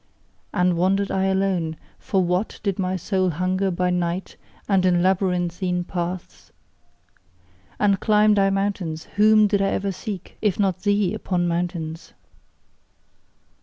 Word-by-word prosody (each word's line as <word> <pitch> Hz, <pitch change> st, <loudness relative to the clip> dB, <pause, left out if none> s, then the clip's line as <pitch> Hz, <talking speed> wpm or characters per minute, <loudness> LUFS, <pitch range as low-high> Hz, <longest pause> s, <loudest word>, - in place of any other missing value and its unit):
And 180 Hz, -1 st, +1 dB
wandered 195 Hz, +3 st, +1 dB
I 190 Hz, 0 st, +1 dB
alone, 190 Hz, -4 st, 0 dB, 0.2 s
for 190 Hz, -2 st, 0 dB
WHAT 180 Hz, +4 st, -1 dB
did 200 Hz, -2 st, -1 dB
my 185 Hz, 0 st, 0 dB
soul 185 Hz, +1 st, 0 dB
hunger 185 Hz, +4 st, 0 dB
by 180 Hz, 0 st, 0 dB
night 180 Hz, +1 st, -2 dB, 0.3 s
and 195 Hz, -3 st, +3 dB
in 175 Hz, -1 st, +3 dB
labyrinthine 180 Hz, -1 st, 0 dB
paths? 175 Hz, 0 st, -5 dB, 1.3 s
And 200 Hz, -2 st, +3 dB
climbed 210 Hz, 0 st, +4 dB
I 195 Hz, 0 st, +4 dB
mountains, 195 Hz, -5 st, -2 dB
WHOM 215 Hz, 0 st, +6 dB
did 200 Hz, -1 st, +1 dB
I 195 Hz, -, +2 dB
ever 200 Hz, 0 st, -1 dB
seek, 190 Hz, 0 st, -7 dB
if 210 Hz, -3 st, 0 dB
not 190 Hz, -2 st, +1 dB
thee, 205 Hz, -1 st, +1 dB
upon 180 Hz, -5 st, -1 dB
mountains? 170 Hz, -1 st, -3 dB
185 Hz, 130 wpm, -23 LUFS, 175-195 Hz, 1.3 s, WHOM